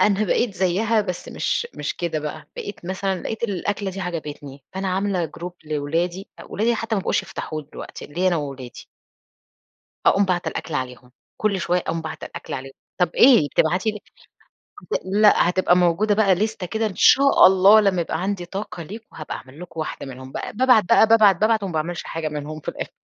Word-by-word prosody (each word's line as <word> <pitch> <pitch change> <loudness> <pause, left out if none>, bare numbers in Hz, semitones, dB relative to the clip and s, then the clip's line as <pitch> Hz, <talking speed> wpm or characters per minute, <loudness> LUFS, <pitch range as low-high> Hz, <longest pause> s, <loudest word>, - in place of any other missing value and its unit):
أنا 205 +2 +3
بقيت 210 +2 0
زيها 200 +5 +1
بس 180 -4 -5
مش - - -1
مش - - -4
كده 170 -3 -2
بقى، 150 0 -7
بقيت 205 -3 -7
مثلًا 190 0 -2
لقيت 220 - -5
الأكلة 200 -1 -2
دي 195 +1 -7
عجبتني 150 -6 -6
فأنا 190 0 -2
عاملة 185 -1 0
جروب 175 +3 -7
لأولادي، 165 +5 -2
أولادي 230 +3 -1
حتى 225 0 -2
ما 200 - 0
بقوش - - 0
يفتحوه 155 -1 -6
دلوقتي، - - -9
ليّا 175 +5 0
أنا 175 - +1
وأولادي. 135 -5 -7 1.2
أقوم 200 +1 +4
باعتة 180 -2 -1
الأكل 165 - -6
عليهم، 125 -2 -5 0.3
كل 200 -3 0
شوية 175 +1 +1
أقوم 165 -1 -3
باعتة 160 0 -7
الأكل - - -8
عليهم، 135 0 -6 0.2
طب 180 -2 +2
ايه 240 - +6
بتبعتي 180 +7 +2
ليه؟ 210 - -8 0.9
هت - - +1
لأ 205 -1 +4
هتبقى 180 0 +3
موجودة 180 +4 +3
بقى 200 -3 +4
ليستة 210 0 -2
كده 220 +5 -1
إن 205 - -4
شاء 275 0 +6
الله 190 +3 +7
لما 195 -4 +2
يبقى 165 0 -2
عندي 195 -2 -2
طاقة 185 -1 -6
ليكم 215 +7 -9
هابقى 155 - -6
أعمل 130 +4 -13
لكم 170 -2 -7
واحدة 155 - -5
منهم 130 0 -10
بقى، - - -5
ب - - -19
بابعت 250 -3 +5
بقى 200 - +5
بابعت 215 -4 +6
بابعت 215 +2 +2
وما 190 - -3
باعملش 165 +2 -2
حاجة 165 -1 -3
منهم 150 +1 -6
في - - -12
الأخر - - -4
185 Hz, 190 wpm, -22 LUFS, 160-205 Hz, 1.2 s, الله